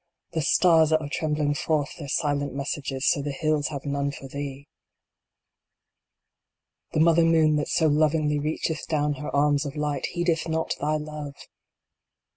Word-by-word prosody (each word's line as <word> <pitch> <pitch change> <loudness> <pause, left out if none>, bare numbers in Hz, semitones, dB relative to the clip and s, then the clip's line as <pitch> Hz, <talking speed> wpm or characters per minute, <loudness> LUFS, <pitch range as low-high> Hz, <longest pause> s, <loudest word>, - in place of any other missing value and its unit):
The 165 -1 -1
stars 160 +1 +4
that 155 0 +3
are 150 - -5
trembling 150 -1 0
forth 145 -1 -1
their 145 - -6
silent 145 -1 -1
messages 140 -1 -3
to 140 - -3
the 145 - -4
hills 150 +1 0
have 140 -2 -6
none 140 0 -1
for 140 -1 -8
thee! 140 +1 -6 2.3
The - - +1
mother 165 +1 +5
moon 160 -2 +4
that 150 - -1
so 160 - +2
lovingly 150 0 +2
reacheth 155 +1 -2
down 150 -2 0
her 150 - -4
arms 145 0 +2
of 145 -1 -6
light 150 -2 -2
heedeth 170 -2 0
not 160 0 -1
thy 150 +1 0
Love 150 -2 -6
150 Hz, 155 wpm, -25 LUFS, 145-155 Hz, 2.3 s, mother